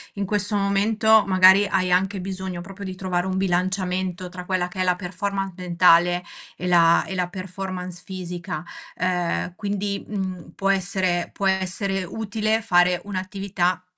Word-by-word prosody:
in 200 - -2
questo 205 +1 0
momento 210 +2 +3
magari 190 +1 +6
hai 185 -2 0
anche 190 +2 +2
bisogno 190 -1 -4
proprio 195 +2 -9
di 185 -1 -5
trovare 185 -1 -2
un 190 0 -1
bilanciamento 185 0 -1
tra 180 0 -8
quella 185 -1 0
che 185 +1 -9
è - - +3
la 180 -1 +2
performance 195 +2 -3
mentale 175 0 +4 0.3
e - - -5
la 170 -2 +5
e 190 - -6
la 180 -1 -1
performance 185 -1 -6
fisica, 175 -4 -5 0.3
ehm, 180 -1 -1
quindi, 200 0 -3
mhmm, 190 -5 -4
può 195 0 +1
essere 185 -2 0
può 200 - -4
essere 190 0 0
utile 220 +3 -1
fare 180 -3 +3
un'attività 185 -2 -2
185 Hz, 150 wpm, -23 LUFS, 180-195 Hz, 0.3 s, magari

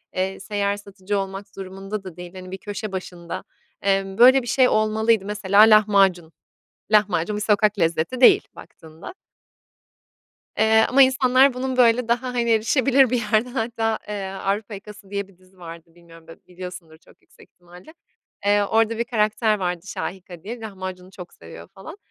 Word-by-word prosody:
eee, 190 +1 -2
seyyar 200 0 -2
satıcı 200 0 -5
olmak 195 +1 -6
durumunda 195 +2 -7
da 180 -3 -11
değil, 175 +1 -10
hani, 185 -1 -10
bir 190 - -6
köşe 205 +1 -7
başında, 175 -2 -7 0.4
emm, 195 0 -1
"Böyle 260 +3 +7
bir 240 - -10
şey 255 +2 +3
olmalıydı." 215 -1 +1
Mesela 205 0 +2
lahmacun. 200 -6 +4 0.6
Lahmacun 205 -2 +2
bir 210 - -3
sokak 210 0 +1
lezzeti 165 +8 -1
değil 250 - +7
baktığında. 160 - -13 1.4
Eee, 220 0 +4
ama 275 +2 +4
insanlar 260 0 +4
bunun, 255 +1 -4
böyle, 240 -1 +3
daha, 250 +2 -1
hani, 235 -1 -1
erişebilir 255 +4 +3
bir 250 - 0
yerde 220 +3 +2
hatta, 225 -2 -2
eee, 210 - -5 0.2
"Avrupa 200 +3 -3
Yakası" 205 0 -12
diye 200 -1 -4
bir 195 -3 -23
dizi 185 0 -26
vardı, 165 -1 -12
bilmiyorum 165 -1 -18
b 165 - -12
biliyorsundur 180 -3 -10
çok - - -24
yüksek - - -22
ihtimalle. 180 - -17 0.5
Eee, 205 0 +3
orada 225 +2 +1
bir 235 - 0
karakter 215 -1 0
vardı 180 0 -4
"Şahika" 180 -3 -7
diye, 235 +3 -7
lahmacunu 185 -3 -8
çok 180 -2 -12
seviyor, 80 0 -13
falan. 320 - -12
200 Hz, 160 wpm, -22 LUFS, 185-225 Hz, 1.4 s, Böyle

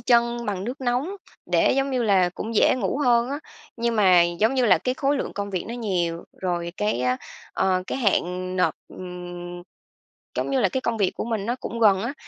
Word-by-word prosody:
chân 235 0 +2
bằng 195 -2 -2
nước 250 +5 -5
nóng 260 +10 -1 0.3
để, - - +3
giống 275 0 +1
như 255 -2 0
là, 195 -5 +4
cũng 225 +1 -5
dễ - - +5
ngủ 235 +3 -1
hơn 240 +1 +3
á. 285 - -2 0.4
Nhưng 235 -1 0
mà, 185 -4 +6
giống 175 +9 +1
như 255 - +2
là, 185 - +5
cái 255 - -1
khối 280 +1 +1
lượng - - -3
công 200 0 -4
việc 185 -3 -2
nó 235 - -4
nhiều, 175 -7 -2 0.2
rồi 175 -2 -2
cái 210 - 0
á, 125 0 +1 0.4
ờ, 185 -1 +1
cái - - -3
hạn 185 -4 0
nộp, 180 - +2
ừm 175 -1 -8 0.7
giống - - -1
như 270 -2 +2
là, 195 - +3
cái 260 - -2
công 235 -2 -1
việc 195 -3 +2
của - - -4
mình 220 -4 -2
nó 240 +2 -1
cũng 230 0 -5
gần 195 -3 +5
á, 245 +5 -3
210 Hz, 220 wpm, -24 LUFS, 180-245 Hz, 0.7 s, mà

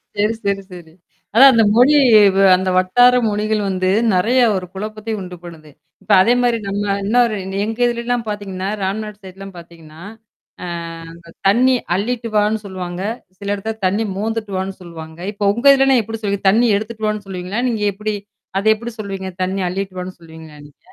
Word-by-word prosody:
சரி, 210 +2 +1
சரி, 200 0 0
சரி. 165 -3 -12 0.4
அதான் 265 +5 +8
அந்த 225 -1 +4
மொழி 255 +5 +5 0.4
வ - - 0 0.2
அந்த 185 +1 -1
வட்டார 245 +7 +4
மொழிகள் 210 +1 -1
வந்து 185 -1 0 0.2
நெறைய 230 +8 +2 0.2
ஒரு 185 -1 -3
குழப்பத்தை 215 +2 -5
உண்டு 180 -1 -8
பண்ணுது. 160 -3 -12 0.3
இப்ப - - -5
அதேமாரி 240 +2 +2
நம்ம 200 +1 -2 0.2
இன்ன 220 +5 0
ஒரு 220 -2 -2 0.3
எங்க 225 +2 -5
இதல 235 0 -1
எல்லாம் 245 -1 -1
பார்த்தீங்கன்னா, 195 -2 -4
ராம்நாடு் 210 +2 -4
சைட்லாம் 195 +1 -10
பார்த்தீங்கன்னா, 165 -2 -14 0.6
அ - - -4 0.5
அந்த 170 0 -16 0.2
தண்ணீ 250 +6 +4 0.2
அள்ளிட்டுவான்னு 220 -1 0
சொல்லுவாங்க. 180 -2 -6 0.4
சில 200 0 -6
இடத்தல 220 +2 -5
தண்ணீ 210 +4 -1
மோந்துட்டுவான்னு 200 -3 -3
சொல்லுவாங்க. 160 -2 -10
இப்ப 200 -1 +1
உங்க 235 +4 -5
இதிலலாம் 270 -3 +3
எப்பிடி 225 +1 -7
சொல்லு 200 -1 -1
தண்ணீ 230 +5 +3
எடுத்துட்டுவான்னு 215 -1 -4
சொல்லுவீங்களா? 190 +4 -4
நீங்க 220 -3 -2
எப்பிடி? 210 +1 -3 0.4
அத 200 - -6
எப்பிடி 230 +1 -8
சொல்வீங்க? 195 -2 -5
தண்ணீி 190 +1 -2
அள்ளிட்டுவான்னு 185 -1 -5
சொல்லுவீங்களா 160 -2 -13
நீங்க? 145 - -24
205 Hz, 160 wpm, -18 LUFS, 185-225 Hz, 0.6 s, அதான்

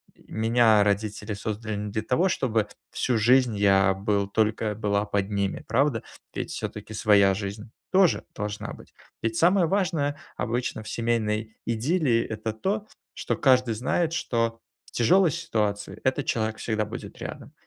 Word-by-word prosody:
меня 110 -1 +3
родители 105 +1 -1
создали 110 +1 -4
не 105 0 -4
для 110 +1 -1
того, 130 - +1
чтобы 115 - 0 0.2
всю 125 - 0
жизнь 120 +1 +4
я 95 -1 +4
был 100 0 0
только 110 +1 0
была 100 -1 0
под 100 -1 -1
ними, 100 -2 -2
правда? 120 0 +1 0.3
Ведь - - -4
всё-таки 110 - -6
своя 100 -2 +4
жизнь 105 +3 -6 0.2
тоже 185 -3 +4
должна 105 0 -4
быть. - - -15 0.3
Ведь 115 0 -1
самое 180 +1 +4
важное, 165 -6 0 0.2
обычно, 120 -2 -2
в - - -8
семейной 110 -2 -1
идиллии- 120 +1 +1
это 110 0 -3
то, 200 - -2 0.3
что - - -2
каждый 125 -4 +3
знает, 155 +8 0
что 115 -7 -1 0.3
в - - -19
тяжелой 170 +8 +4
ситуации, 105 - -2
этот 130 +2 0
человек 110 -1 -1
всегда 110 -2 -1
будет 105 - -8
рядом. - - -8
110 Hz, 150 wpm, -26 LUFS, 105-130 Hz, 0.3 s, жизнь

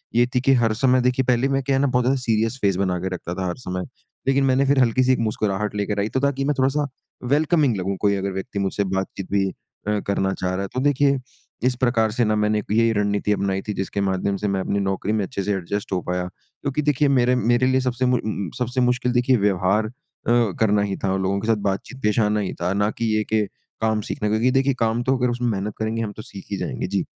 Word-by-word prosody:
ये 120 - +5
थी 125 - +3
की 135 +1 +4
हर 110 -1 +2
समय 130 +2 +3
देखिए 125 +1 +1
पहले 125 +1 +2
मैं 135 - 0
क्या 135 +1 +1
है 135 - +2
ना 140 - +3
बहुत 125 -1 +1
ज़्यादा 135 +1 +2
सीरियस 115 +1 0
फेस 100 -2 +2
बना 95 -2 0
के 95 +1 -3
रखता 85 -1 -5
था 95 -1 -2
हर 90 - -2
समय। 90 -6 -4 0.4
लेकिन 135 0 +3
मैंने 135 +1 +3
फिर 140 -1 +3
हल्की-सी 125 +1 +3
एक - - -1
मुस्कुराहट 105 -1 -1
लेकर 105 0 -1
आई 105 +2 0
तो 130 - -1
ताकि 140 -1 0
मैं 150 - +2
थोड़ा-सा 140 +2 +2 0.5
वेलकमिंग 150 -4 +3
लगूँ। 95 +1 -2
कोई 100 -1 +3
अगर 100 0 -2
व्यक्ति 100 +2 -4
मुझसे 100 +1 0
बातचीत 95 0 -3
भी 100 -1 +2
अ, 105 +2 -5
करना 95 -1 +1
चाह 90 -1 -2
रहा 95 - -2
है 100 - -3
तो 130 - -1
देखिए 140 -1 +3 0.5
इस 125 - +1
प्रकार 115 -3 +2
से 120 +2 +1
ना 110 0 +2
मैंने 105 0 +2
यही 115 +1 +3
रणनीति 105 0 0
अपनाई 95 -1 -1
थी 105 - -1
जिसके 100 +1 -3
माध्यम 95 +1 0
से 105 - -2
मैं 95 -1 0
अपनी 100 +1 -1
नौकरी 95 +2 -1
में 105 -2 +1
अच्छे 100 -3 -4
से 105 - 0
एडजस्ट 100 +2 -3
हो 90 - 0
पाया 90 0 -1
क्योंकि 140 +9 -5
देखिए 150 0 +2
मेरे 125 +1 +3
मेरे 120 +1 +2
लिए 130 0 +3
सबसे 125 0 -1
मु 125 -1 +2 0.4
सबसे 125 +1 0
मुश्किल 125 0 +1
देखिए 125 +1 +3
व्यवहार 100 +1 +2
अ, - - -10 0.7
करना 105 -2 +3
ही 100 -1 -2
था 95 - +1
और 95 - 0
लोगों 95 +1 0
के 110 - -4
साथ 115 -1 +3
बातचीत 130 +7 -7
पेशा 105 +1 +3
आना 105 0 +1
ही 95 - -3
था 90 +2 0
ना 105 +2 +1
कि 115 - -1
ये 110 - +1
के 110 -1 +3 0.4
काम 110 -1 +1
सीखना 105 - -3
है - - 0
क्योंकि 115 +4 +2
देखिए 135 +1 +2
काम 115 +1 +1
तो 130 +2 +2
अगर 125 -1 +1
उसमें 120 0 -1
मेहनत 105 0 -2
करेंगे 110 +1 -1
हम 105 - -4
तो 110 - -5
सीख 95 - -10
ही - - -1
जाएँगे। - - -3
जी। - - -1
110 Hz, 250 wpm, -22 LUFS, 100-125 Hz, 0.7 s, ये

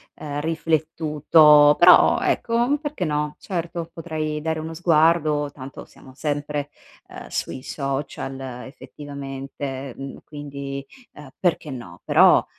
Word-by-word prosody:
ehm, 145 -1 -5
riflettuto. 155 -2 +4
Però - - +7
ecco 240 +5 +1
perché 295 - -3
no, 150 0 -2
certo 170 -2 -4
potrei 155 -2 -4
dare 160 0 -2
uno 160 +1 -6
sguardo 155 -3 +2
tanto 135 -1 -10
siamo 130 - -17
sempre, 145 0 -3 0.4
ehm, - - -10
sui 130 - -4
social 135 -1 -4 0.3
effettivamente, 135 -2 -7
mhmm, 135 0 -7
quindi, 140 -2 -7 0.3
ehm, 145 -3 -12
perché 170 -4 0
no, 110 -10 -9
però - - +5
150 Hz, 115 wpm, -23 LUFS, 140-160 Hz, 0.4 s, Però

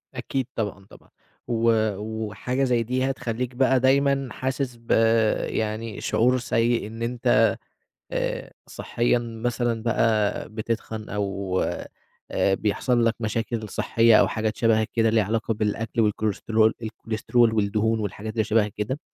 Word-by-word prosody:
أكيد 130 -2 -3
طبعًا، 100 -3 -3
طبعًا، - - -18 0.4
و 115 -1 +2 0.3
وحاجة 110 +5 -3
زي 120 -3 +2
دي 130 +3 0
هتخلّيك 125 -1 -3
بَقى 130 0 +3
دايمًا 135 0 +2
حاسِس 130 0 -3
ب 115 0 -8 0.6
يعني 110 0 -3
شُعور 125 +3 +2
سيء، 115 -2 +1
إن 115 +1 -9
أنت 120 +1 +3 0.6
آآ - - -2 0.2
صحيًا 120 0 0
مثلًا 120 0 -2
بقى 110 -2 +1
بتتخن، 110 0 -4
أو 100 -2 -2 0.7
آآ 95 - +2
بيحصل 115 +4 +1
لك 115 - +2
مشاكل 110 0 -2
صحية 115 +2 +3
أو - - +4
حاجات 110 -1 -2
شبه 115 -2 +3
كده، 115 -1 +3
ليها 110 -1 +3
علاقة 110 +2 -1
بالأكل 110 +2 -1
والكوليسترول 110 +1 +1
الكوليسترول 115 +1 0
والدهون 110 +1 +1
والحاجات 105 +1 -4
اللي 110 -2 +1
شبه 110 0 +2
كده، 105 +7 -4
115 Hz, 130 wpm, -24 LUFS, 110-120 Hz, 0.7 s, أو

